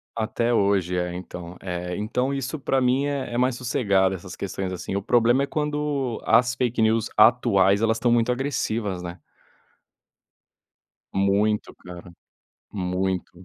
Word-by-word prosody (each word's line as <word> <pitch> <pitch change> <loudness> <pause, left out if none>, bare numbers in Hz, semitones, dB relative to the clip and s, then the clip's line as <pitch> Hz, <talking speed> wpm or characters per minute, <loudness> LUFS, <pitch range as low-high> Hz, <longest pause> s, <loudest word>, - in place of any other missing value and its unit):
Até 115 +1 -1
hoje, 95 -4 +1
é, 90 0 -2
então. 90 -1 -8
Eh, 90 -1 -4
então 125 +6 -1
isso 135 +2 -3
pra 135 -1 0
mim 130 +3 +2
é 140 -4 -3
é - - -1
mais 125 0 +2
sossegado, 100 -6 +1
essas 90 0 -9
questões 95 -1 -4
assim, 95 +2 -5
o 100 - -1
problema 120 +4 +3
é - - +1
quando, 150 -5 -2
as 125 +2 +3
fake 120 -1 0
news 110 0 +2
atuais, 105 -3 +4
elas 115 0 +2
estão 120 +1 +1
muito 120 +1 +3
agressivas, 115 -7 -2
né. 85 0 -7 1.9
Muito 100 +2 +1
cara, 90 0 -11 0.6
muito. 95 -1 -2
110 Hz, 145 wpm, -24 LUFS, 95-125 Hz, 1.9 s, atuais